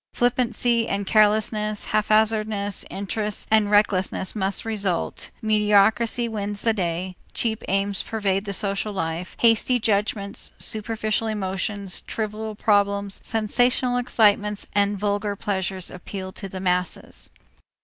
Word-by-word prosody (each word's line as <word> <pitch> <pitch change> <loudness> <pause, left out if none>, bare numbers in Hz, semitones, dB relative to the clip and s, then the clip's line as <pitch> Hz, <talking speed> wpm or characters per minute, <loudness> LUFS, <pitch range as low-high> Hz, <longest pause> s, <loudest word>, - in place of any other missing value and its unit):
Flippancy 240 -1 +1
and 200 0 -2
carelessness, 215 0 +2
haphazard 215 0 +3 0.4
interests 210 +2 -3
and 215 -2 +4
recklessness 200 -2 +2
must 195 0 +1
result, 200 -6 -2
mediocrity 215 +2 +3
wins 205 -2 -4
the 225 - +3
day, 180 -1 -2 0.2
cheap 220 -2 -1
aims 195 +1 0
pervade 200 -3 -1
the 200 - -3
social 200 +1 -1
life, 170 -1 -3
hasty 235 +2 +4
judgments, 205 -2 -1
superficial 220 0 -2
emotions, 195 -1 -3
trivial 215 0 -4
problems, 200 -1 +1
sensational 245 +3 +1
excitements, 210 -4 +2
and 205 0 +2
vulgar 205 0 -1
pleasures 190 -2 -2
appeal 185 +1 -7
to 195 +1 -7
the 185 - -6
masses. 180 -1 -2
210 Hz, 115 wpm, -24 LUFS, 195-220 Hz, 0.4 s, and